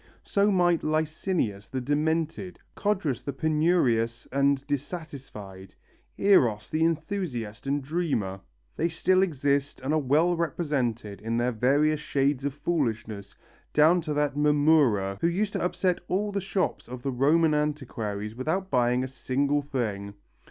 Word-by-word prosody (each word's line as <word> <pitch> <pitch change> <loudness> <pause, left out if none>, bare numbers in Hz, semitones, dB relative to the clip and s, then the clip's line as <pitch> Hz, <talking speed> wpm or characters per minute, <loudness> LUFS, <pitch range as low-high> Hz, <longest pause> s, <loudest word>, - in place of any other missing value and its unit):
So 200 +1 +2
might 175 -4 +3
Lycinius 155 - -1
the 130 - -3
demented, 160 +6 -1 0.2
Codrus 190 - -1
the 140 - -5
penurious 135 -7 +1
and 140 0 +2
dissatisfied, 135 - -6 0.4
Eros 125 - +3
the 155 +1 +1
enthusiast 160 - -2
and 140 0 0
dreamer. 135 - -2 0.4
They 170 - +1
still 185 +3 +2
exist 140 -5 0
and 135 +3 -2
are 155 - +3
well 155 +6 +2
represented 130 - -2
in 115 +2 -2
their 120 +1 +1
various 145 +6 +2
shades 140 -2 0
of 140 -1 -2
foolishness 115 -10 -2 0.4
down 160 +4 +5
to 155 -2 -3
that 145 -1 +1
Mamurra 145 -10 +3
who - - +3
used 200 +4 -1
to - - -2
upset 180 0 0
all 205 +3 0
the 200 0 -2
shops 190 -2 -2
of 125 0 -8
the 135 - -1
Roman 155 +5 +3
antiquaries 120 -9 -2
without 160 +10 -2
buying 125 -1 +2
a - - -3
single 140 +2 0
thing. 105 -8 -3
145 Hz, 140 wpm, -27 LUFS, 125-165 Hz, 0.4 s, down